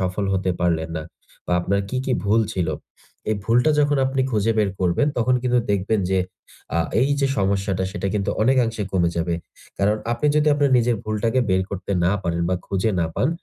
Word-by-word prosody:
সফল 95 Hz, +2 st, -1 dB
হতে 95 Hz, -1 st, 0 dB
পারলেন 85 Hz, -2 st, +1 dB
না? 80 Hz, -, -3 dB, 0.4 s
বা -, -, -1 dB
আপনার 100 Hz, +3 st, 0 dB
কি, 130 Hz, -, -3 dB
কি 130 Hz, -, 0 dB
ভুল 110 Hz, +3 st, +3 dB
ছিল? 90 Hz, -4 st, -1 dB, 0.6 s
এই -, -, +2 dB
ভুলটা 120 Hz, +7 st, +3 dB
যখন 145 Hz, 0 st, +2 dB
আপনি 135 Hz, 0 st, -1 dB
খুঁজে 110 Hz, 0 st, +1 dB
বের 105 Hz, -2 st, +2 dB
করবেন, 90 Hz, +11 st, +2 dB
তখন 125 Hz, +2 st, +2 dB
কিন্তু 125 Hz, -1 st, +2 dB
দেখবেন 100 Hz, +2 st, +1 dB
যে 95 Hz, -, +2 dB, 0.6 s
আ -, -, +2 dB, 0.2 s
এই 130 Hz, -, +3 dB
যে 140 Hz, -, +3 dB
সমস্যাটা, 95 Hz, -1 st, 0 dB
সেটা 100 Hz, -, -3 dB
কিন্তু 100 Hz, -2 st, 0 dB
অনেকাংশে 115 Hz, -3 st, +2 dB
কমে 85 Hz, -2 st, +2 dB
যাবে। 85 Hz, 0 st, 0 dB, 0.4 s
কারণ, 105 Hz, +2 st, +2 dB, 0.2 s
আপনি 120 Hz, +5 st, -1 dB
যদি 150 Hz, 0 st, +3 dB
আপনার 145 Hz, -1 st, +2 dB
নিজের 120 Hz, 0 st, +2 dB
ভুলটাকে 110 Hz, +4 st, 0 dB
বের 95 Hz, 0 st, +3 dB
করতে 100 Hz, 0 st, -4 dB
না 95 Hz, -, +3 dB
পারেন 85 Hz, -1 st, -1 dB
বা 90 Hz, -, +1 dB
খুঁজে 100 Hz, +3 st, 0 dB
না 85 Hz, -, +1 dB
পান, 130 Hz, -, +1 dB
100 Hz, 195 wpm, -22 LUFS, 95-120 Hz, 0.6 s, ভুল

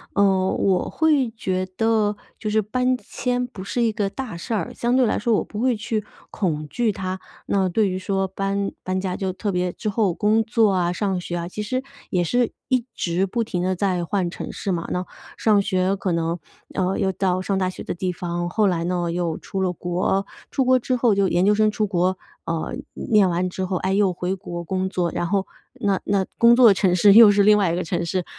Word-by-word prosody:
嗯 190 Hz, -2 st, +3 dB
我 190 Hz, -2 st, +1 dB
会 300 Hz, -6 st, +2 dB
觉 185 Hz, -4 st, -2 dB
得 220 Hz, -2 st, +2 dB, 0.2 s
就 215 Hz, -, -4 dB
是 215 Hz, +1 st, +2 dB
搬 250 Hz, +4 st, 0 dB
迁 250 Hz, 0 st, -2 dB
不 210 Hz, -7 st, -9 dB
是 240 Hz, +5 st, -2 dB
一 225 Hz, -2 st, +2 dB
个 205 Hz, -2 st, -1 dB
大 250 Hz, -2 st, -6 dB
事 170 Hz, +7 st, -5 dB
儿， 200 Hz, -7 st, -2 dB
相 240 Hz, +2 st, +1 dB
对 260 Hz, -, +4 dB
来 215 Hz, -, +1 dB
说 230 Hz, +1 st, +1 dB
我 -, -, +1 dB
不 210 Hz, -, -6 dB
会 250 Hz, -2 st, +2 dB
去 215 Hz, 0 st, -2 dB, 0.3 s
恐 155 Hz, -6 st, -2 dB
惧 235 Hz, +7 st, 0 dB
它。 185 Hz, -1 st, -4 dB, 0.2 s
那 190 Hz, -2 st, +1 dB
对 205 Hz, +3 st, +2 dB
于 185 Hz, -, -2 dB
说 195 Hz, +1 st, -1 dB
搬 195 Hz, +1 st, -2 dB
搬 185 Hz, 0 st, -1 dB
家 185 Hz, -1 st, -2 dB
就 190 Hz, -1 st, -2 dB
特 205 Hz, +3 st, -4 dB
别 180 Hz, 0 st, 0 dB
之 215 Hz, -, -7 dB
后 205 Hz, -3 st, +1 dB
工 215 Hz, +4 st, +2 dB
作 220 Hz, -2 st, +3 dB
啊 180 Hz, -2 st, +1 dB
上 190 Hz, 0 st, -1 dB
学 175 Hz, 0 st, -4 dB
啊， 170 Hz, -, -4 dB
其 210 Hz, +4 st, -5 dB
实 255 Hz, +5 st, -2 dB, 0.3 s
也 180 Hz, -, +1 dB
是 240 Hz, +7 st, +1 dB, 0.2 s
一 255 Hz, -3 st, +1 dB
直 175 Hz, +2 st, 0 dB
不 230 Hz, +5 st, -1 dB
停 180 Hz, -4 st, -2 dB
地 185 Hz, +1 st, +1 dB
在 185 Hz, -1 st, 0 dB
换 180 Hz, 0 st, -1 dB
城 -, -, -6 dB
市 195 Hz, -, -3 dB
嘛。 170 Hz, -1 st, -3 dB
那 180 Hz, +1 st, -2 dB, 0.3 s
上 210 Hz, -2 st, +3 dB
学 190 Hz, -1 st, +1 dB
可 190 Hz, -1 st, -2 dB
能， 170 Hz, 0 st, -1 dB, 0.4 s
呃， 185 Hz, 0 st, 0 dB
又 190 Hz, -2 st, +1 dB
到 185 Hz, 0 st, 0 dB
上 195 Hz, +1 st, -1 dB
大 185 Hz, -1 st, +1 dB
学 185 Hz, -, -8 dB
的 -, -, -4 dB
地 180 Hz, +1 st, -2 dB
方， 175 Hz, 0 st, -3 dB
后 210 Hz, +3 st, +2 dB
来 170 Hz, -3 st, 0 dB
呢 175 Hz, 0 st, -1 dB
又 170 Hz, -1 st, -1 dB
出 190 Hz, -, -5 dB
了 185 Hz, -1 st, +1 dB
国， 180 Hz, +3 st, -1 dB, 0.3 s
出 265 Hz, -, +1 dB
国 255 Hz, 0 st, +5 dB
之 255 Hz, +1 st, -1 dB
后 235 Hz, -4 st, +3 dB
就 195 Hz, -1 st, +2 dB
研 175 Hz, +2 st, +2 dB
究 210 Hz, +1 st, +4 dB
生 215 Hz, 0 st, +3 dB
出 215 Hz, 0 st, -1 dB
国， 185 Hz, 0 st, +1 dB, 0.3 s
呃， 165 Hz, -1 st, -3 dB, 0.3 s
念 210 Hz, -4 st, +5 dB
完 180 Hz, +1 st, 0 dB
之 190 Hz, +1 st, -4 dB
后 185 Hz, 0 st, -1 dB
诶 190 Hz, +1 st, 0 dB
又 200 Hz, -2 st, +3 dB
回 180 Hz, +2 st, -2 dB
国 175 Hz, -2 st, -6 dB
工 190 Hz, +2 st, -1 dB
作。 180 Hz, -2 st, -1 dB
然 175 Hz, 0 st, -2 dB
后 195 Hz, +1 st, 0 dB, 0.3 s
那 200 Hz, -2 st, +1 dB
那 195 Hz, -1 st, +1 dB
工 235 Hz, 0 st, +6 dB
作 245 Hz, -1 st, +7 dB
的 210 Hz, -, +7 dB
城 190 Hz, -2 st, +2 dB
市 200 Hz, +3 st, +6 dB
又 220 Hz, -1 st, +9 dB
是 200 Hz, 0 st, +4 dB
另 210 Hz, +1 st, +6 dB
外 195 Hz, -5 st, +2 dB
一 -, -, 0 dB
个 180 Hz, -, -1 dB
城 170 Hz, +1 st, -2 dB
市， 180 Hz, +1 st, -2 dB
195 Hz, 250 characters per minute, -22 LUFS, 180-215 Hz, 0.4 s, 又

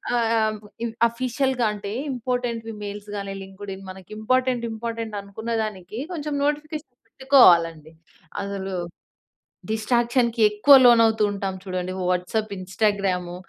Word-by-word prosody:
ఆహ్, 235 Hz, -1 st, +2 dB
ఆహ్, 215 Hz, 0 st, +1 dB
బ్ -, -, -13 dB, 0.2 s
ఇన్ 230 Hz, -1 st, -3 dB, 0.2 s
ఆఫీషియల్‌గా 255 Hz, +1 st, -1 dB
అంటే 200 Hz, -1 st, -6 dB, 0.2 s
ఇంపార్టెంట్‌వి 240 Hz, -2 st, -3 dB
మెయిల్స్ 205 Hz, 0 st, -7 dB
గానీ 200 Hz, -1 st, -5 dB
లింకుడ్ఇన్ 195 Hz, 0 st, -9 dB
మనకి 185 Hz, 0 st, -14 dB
ఇంపార్టెంట్ 255 Hz, +1 st, +1 dB
ఇంపార్టెంట్ 225 Hz, -1 st, -5 dB
అనుకున్న 210 Hz, +4 st, -7 dB
దానికి 210 Hz, 0 st, -6 dB
కొంచెం 300 Hz, -3 st, -4 dB
నోటిఫికేషన్ 295 Hz, -1 st, -3 dB
పెట్టుకోవాలండి. 170 Hz, -, +4 dB, 0.5 s
అసలు 195 Hz, -1 st, -4 dB, 1.0 s
డిస్ట్రాక్షన్‌కి 235 Hz, +1 st, +1 dB
ఎక్కువ 210 Hz, +7 st, +6 dB
లోనవుతూ 230 Hz, -2 st, +6 dB
ఉంటాం 195 Hz, -1 st, -3 dB
చూడండి. 185 Hz, -1 st, -4 dB, 0.2 s
WhatsApp, 185 Hz, +4 st, -1 dB
Instagram, 185 Hz, -2 st, -1 dB
220 Hz, 115 wpm, -24 LUFS, 195-240 Hz, 1.0 s, ఎక్కువ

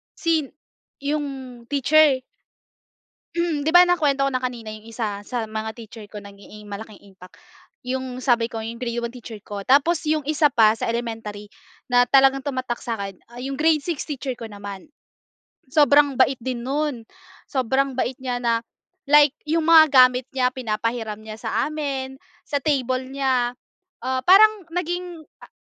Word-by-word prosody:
Sin 320 Hz, -4 st, 0 dB, 0.6 s
yung 270 Hz, -5 st, -4 dB
teacher? 285 Hz, -1 st, +3 dB, 1.1 s
Mm, 335 Hz, -4 st, -1 dB
'di 320 Hz, -, +2 dB
ba, 355 Hz, -, +9 dB
nakwento 285 Hz, -6 st, +2 dB
ko -, -, +1 dB
na 255 Hz, -, 0 dB
kanina 240 Hz, -3 st, -4 dB
yung 215 Hz, 0 st, -10 dB
isa 215 Hz, -3 st, -4 dB
sa 230 Hz, -2 st, -4 dB
mga 220 Hz, 0 st, -4 dB
teacher 225 Hz, -2 st, -11 dB
ko 210 Hz, 0 st, -10 dB
naging 205 Hz, +1 st, -13 dB
malaking 210 Hz, 0 st, -9 dB
impact. 190 Hz, -2 st, -16 dB, 0.5 s
Yung 255 Hz, 0 st, -4 dB
sabi 235 Hz, -3 st, +2 dB
ko 225 Hz, -1 st, -6 dB
yung 230 Hz, +1 st, -7 dB
grade 240 Hz, -1 st, -3 dB
1 235 Hz, -, -4 dB
teacher 240 Hz, -3 st, -9 dB
ko. 205 Hz, -1 st, -6 dB
Tapos 290 Hz, +5 st, +4 dB
yung 305 Hz, -2 st, +1 dB
isa 300 Hz, 0 st, +3 dB
pa 225 Hz, -5 st, +4 dB
sa 225 Hz, -, -4 dB
elementary 225 Hz, -3 st, -5 dB, 0.4 s
na 245 Hz, 0 st, +4 dB
talagang 270 Hz, 0 st, +4 dB
tumatak 255 Hz, -4 st, -3 dB
sa'kin, 200 Hz, -5 st, -4 dB, 0.2 s
ah, 240 Hz, -, -12 dB
yung 270 Hz, +2 st, -4 dB
grade 315 Hz, -2 st, +3 dB
6 335 Hz, -5 st, -3 dB
teacher 275 Hz, -2 st, -4 dB
ko 235 Hz, -2 st, -8 dB
naman. 200 Hz, +1 st, -9 dB, 0.8 s
Sobrang 290 Hz, -1 st, +5 dB
bait 265 Hz, 0 st, +3 dB
din 245 Hz, 0 st, -4 dB
nun. 280 Hz, -2 st, -2 dB, 0.5 s
Sobrang 265 Hz, 0 st, 0 dB
bait 260 Hz, 0 st, -1 dB
niya 250 Hz, -2 st, -2 dB
na 230 Hz, -1 st, +1 dB, 0.5 s
like 295 Hz, -1 st, +6 dB
yung 320 Hz, +1 st, 0 dB
mga 320 Hz, -2 st, +7 dB
gamit 255 Hz, -1 st, +5 dB
niya 250 Hz, -1 st, +2 dB
pinapahiram 225 Hz, -2 st, -3 dB
niya 215 Hz, 0 st, -9 dB
sa -, -, -1 dB
amin, 275 Hz, -3 st, -4 dB, 0.3 s
sa 285 Hz, -, -1 dB
table 260 Hz, -3 st, 0 dB
niya, 260 Hz, -3 st, 0 dB, 0.5 s
ah, 260 Hz, 0 st, 0 dB
parang 410 Hz, 0 st, +6 dB
naging 355 Hz, -1 st, -3 dB, 0.2 s
a -, -, -11 dB
255 Hz, 160 wpm, -23 LUFS, 230-290 Hz, 1.1 s, ba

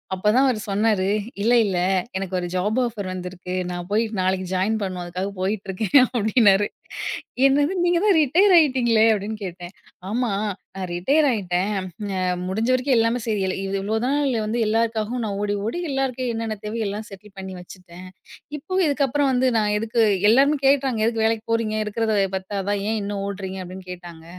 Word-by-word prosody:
அப்பதான் 215 Hz, +8 st, +3 dB
அவரு 235 Hz, -4 st, 0 dB
சொன்னாரு, 205 Hz, -2 st, +1 dB, 0.3 s
இல்ல, 235 Hz, +3 st, +3 dB
இல்ல, 190 Hz, -3 st, -1 dB, 0.4 s
எனக்கு 190 Hz, -1 st, -3 dB
ஒரு 175 Hz, -, -3 dB
ஜாப் 210 Hz, +6 st, 0 dB
ஆஃபர் 210 Hz, -5 st, -4 dB
வந்துருக்கு. 180 Hz, 0 st, -6 dB, 0.2 s
நா 175 Hz, -, -4 dB
போய் 220 Hz, +2 st, +3 dB, 0.2 s
நாளைக்கு 185 Hz, 0 st, 0 dB
ஜாயின் 210 Hz, +4 st, +1 dB
பண்ணணும். 185 Hz, -2 st, -3 dB
அதுக்காக 185 Hz, +3 st, -4 dB
போயிட்டுருக்கேன் 200 Hz, +5 st, +2 dB
அப்டின்னாரு. 205 Hz, -2 st, +4 dB, 0.8 s
என்னது, 290 Hz, +6 st, +3 dB
நீங்க 345 Hz, -1 st, +3 dB
தான் 405 Hz, -4 st, +4 dB
ரிட்டயர் 360 Hz, +8 st, +4 dB
ஆயிட்டீங்களே 240 Hz, -7 st, +4 dB
அப்படின்னு 210 Hz, +1 st, -3 dB
கேட்டேன். 175 Hz, +1 st, -8 dB, 0.4 s
ஆமா 245 Hz, 0 st, 0 dB, 0.5 s
நா -, -, -5 dB
ரிட்டயர் 275 Hz, -, +2 dB
ஆயிட்டேன். 195 Hz, -2 st, -1 dB, 0.4 s
அ -, -, -1 dB, 0.3 s
முடிஞ்ச 220 Hz, +6 st, -1 dB
வரைக்கும், 255 Hz, 0 st, +2 dB
எல்லாமே 230 Hz, +2 st, +2 dB
சரி 215 Hz, -3 st, -1 dB
இல்ல, 185 Hz, -, -1 dB, 0.2 s
இவ்ளோ 210 Hz, +3 st, -2 dB
நாள் 280 Hz, -1 st, +1 dB
வந்து, 225 Hz, +3 st, -2 dB
எல்லாருக்காகவும் 225 Hz, +1 st, 0 dB
நான், 200 Hz, -2 st, -3 dB
ஓடி 205 Hz, 0 st, 0 dB
ஓடி 235 Hz, +10 st, -2 dB
எல்லாருக்கும் 260 Hz, -2 st, -1 dB
என்னென்ன 225 Hz, -1 st, -3 dB
தேவையோ, 220 Hz, +1 st, -3 dB
எல்லாம் 210 Hz, +2 st, -4 dB
செட்டில் 195 Hz, +1 st, -13 dB
பண்ணி 190 Hz, 0 st, -7 dB
வச்சுட்டேன். 180 Hz, 0 st, -12 dB, 0.5 s
இப்போ 370 Hz, +6 st, -6 dB
இதுக்கப்புறம் 280 Hz, -1 st, +1 dB
வந்து 255 Hz, +1 st, +2 dB
நா -, -, +3 dB, 0.2 s
எதுக்கு 225 Hz, +2 st, 0 dB, 0.3 s
எல்லாருமே 280 Hz, +5 st, +4 dB
கேட்டாங்க. 270 Hz, -4 st, +3 dB
எதுக்கு 225 Hz, -1 st, 0 dB
வேலைக்கு 225 Hz, 0 st, 0 dB
போறீங்க? 225 Hz, -1 st, 0 dB
இருக்றத 220 Hz, 0 st, -1 dB, 0.2 s
பத்தாதா, 195 Hz, +1 st, -2 dB
ஏன் 220 Hz, -, 0 dB
இன்னும் 200 Hz, 0 st, -3 dB
ஓடுறீங்க? 190 Hz, -1 st, -5 dB
அப்படின்னு 185 Hz, +1 st, -9 dB
கேட்டாங்க. 170 Hz, -2 st, -10 dB
215 Hz, 160 wpm, -23 LUFS, 190-245 Hz, 0.8 s, அப்டின்னாரு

